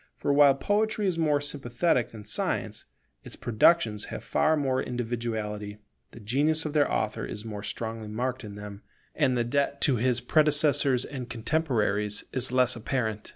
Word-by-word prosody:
For 140 - 0
while 140 -1 +6
Poetry 210 +6 0
is 180 -3 0
more 150 -3 +2
sympathetic 140 -2 0
than 105 -2 -11
Science, - - -2 0.4
its - - -8
productions 115 -2 +2
have - - -7
far 155 0 +2
more 130 -3 0
individuality; 110 -4 -4 0.3
the - - -13
genius 145 +9 +1
of 150 - -3
their 150 -2 +2
author 110 -1 -1
is 105 +1 -6
more 105 -2 -6
strongly 110 +1 -5
marked 125 +4 -3
in 105 -2 -8
them, 105 0 -9 0.3
and 130 -5 +1
the 120 - +2
debt 140 +3 0
to 135 -4 +3
his 125 +1 +1
predecessors 145 -1 +3
and 130 -4 -7
contemporaries 115 -5 0
is 130 -2 +1
less 125 -1 +3
apparent. 110 -3 -3
125 Hz, 160 wpm, -27 LUFS, 110-145 Hz, 0.4 s, while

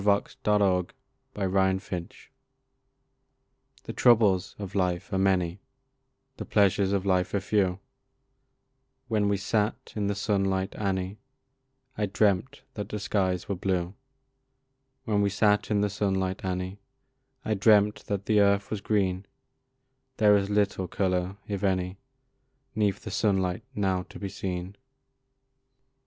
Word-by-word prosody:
Wormwood 100 -2 +1 0.4
and 95 -2 -1
Nightshade 95 -2 -2 1.7
The - - -6
troubles 105 -7 +4
of 100 -2 -7
life 90 0 -1
are 95 - +1
many, 95 -2 +1 0.8
The - - -4
pleasures 100 -1 +3
of 100 -1 0
life 95 0 +1
are - - +2
few; 95 -2 0 1.3
When 105 -2 +2
we 100 - +1
sat 105 +2 -1
in 105 -2 -1
the 100 - -1
sunlight, 95 -2 0
Annie, 95 0 -2 0.8
I 105 - +1
dreamt 105 +6 +1
that 105 -1 -5
the 105 - -3
skies 95 -4 -1
were 100 - -1
blue 90 -1 -1 1.1
When 105 -3 +1
we 100 - +2
sat 105 +1 +2
in 105 -2 +2
the 105 - +1
sunlight, 95 -2 -1
Annie, 95 +1 -3 0.7
I 110 - +1
dreamt 105 0 +3
that 100 -1 -2
the 110 -2 +3
earth 100 0 +3
was 105 -2 -2
green; 95 -2 0 0.9
There 105 -3 +6
is 100 0 +1
little 100 -2 +1
colour, 90 +1 -1
if 100 -1 -3
any, 95 -1 0 0.7
'Neath 105 -2 0
the - - -6
sunlight 95 -4 +1
now 95 -3 +1
to - - -10
be 100 - -5
seen. 95 +1 -5
100 Hz, 130 wpm, -27 LUFS, 95-105 Hz, 1.7 s, There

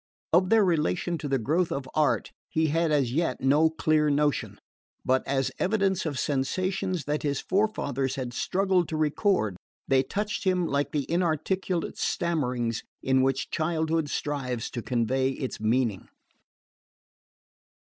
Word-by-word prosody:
Of 180 +2 +4
their 225 -2 +5
relation 170 0 0
to 145 - -4
the 135 -1 +1
growth 160 +9 0
of 140 -1 -3
art 155 -1 +1 0.2
he 160 0 +1
had 165 +1 +1
as 135 -5 +1
yet 165 -3 0
no 145 +4 +4
clear 155 -1 +2
notion; 145 0 0 0.5
but 130 +1 +3
as 135 -1 0
evidence 190 -3 +1
of 145 -4 -3
sensations 185 +6 -1
that 150 +1 -1
his 145 -2 -1
forefathers 140 - 0
had 125 -2 -4
struggled 185 +2 +1
to 160 - -2
record, 155 - +1 0.3
they 135 -1 +4
touched 205 +9 -3
him 185 -2 +2
like 140 -2 -1
the 145 -3 -1
inarticulate 175 +1 -1
stammerings 125 -9 -1 0.2
in 130 0 +3
which 135 0 0
childhood 160 -1 0
strives 130 -7 -3
to 120 - -4
convey 130 +3 0
its 130 -1 -5
meaning. 110 -2 0
150 Hz, 140 wpm, -27 LUFS, 135-175 Hz, 0.5 s, their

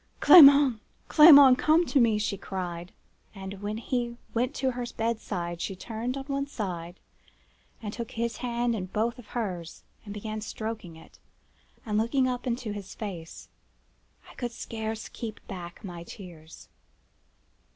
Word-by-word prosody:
"'Clement! 280 -7 +8 0.3
Clement! 285 -5 +9
come 320 +3 +3
to 290 - +1
me!' 225 -3 +3
she 210 -1 -1
cried; 180 -2 -6 0.4
and 195 0 -8
when 210 +1 -3
he 240 0 -3 0.2
went 250 +4 -1
to 265 -1 0
the 245 -1 -6
bedside 195 -7 -3
she 195 - -3
turned 230 +6 -5
on 270 - -5
one 275 0 -3
side, 180 -8 -6 0.8
and 210 -1 -5
took 230 0 -6
his 235 0 -3
hand 240 -1 -1
in 190 -4 -4
both 225 +6 -2
of 230 - -13
hers, 180 -8 -5 0.2
and 205 - -9
began 215 +1 -5
stroking 215 -5 -6
it, 160 - -17 0.7
and 210 -1 0
looking 255 +4 +1
up 250 0 -3
in 240 -1 0
his 205 -5 -7
face. 180 -7 -8 0.8
I - - -14
could 245 -2 -5
scarce 220 -1 -5
keep 225 -2 -7
back 175 -2 -9
my 175 -4 -7
tears. 170 -3 -12
220 Hz, 150 wpm, -27 LUFS, 190-245 Hz, 0.8 s, Clement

